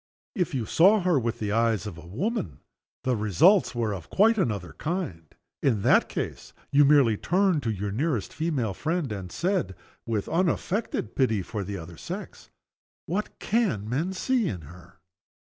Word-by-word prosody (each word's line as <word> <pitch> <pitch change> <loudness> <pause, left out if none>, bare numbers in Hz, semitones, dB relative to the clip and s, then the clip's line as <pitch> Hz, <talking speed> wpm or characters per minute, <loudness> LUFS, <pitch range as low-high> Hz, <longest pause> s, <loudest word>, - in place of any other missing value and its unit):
If 180 - -1
you 120 -4 -1
saw 195 - +5
her 175 -5 +3
with 115 -1 -2
the 105 -2 -3
eyes 115 -1 +1
of 105 -5 -6
a 85 0 -12
woman, 110 - -3 0.4
the 130 -1 +1
results 110 - +4
were 115 -3 0
of 90 -4 -8
quite 220 +2 +4
another 100 - -1
kind. 145 - -3 0.3
In 110 -7 +1
that - - +4
case - - -5 0.2
you 145 +1 +6
merely 135 -7 +5
turned 185 - +2
to 115 - -2
your 100 -1 -2
nearest 125 - -1
female 145 -10 -1
friend, 160 - -2
and 95 -4 -5
said, 175 - -1 0.3
with 110 -3 -1
unaffected 180 - -1
pity 110 -7 +2
for 105 +3 -4
the 100 +1 -5
other 85 -1 -9
sex, - - -8 0.6
"What 195 +6 -3
can 205 - 0
the 105 - -7
men 165 +9 -1
see 240 +3 +1
in 90 -5 -4
her!" 85 +4 -14
120 Hz, 170 wpm, -26 LUFS, -, 0.6 s, you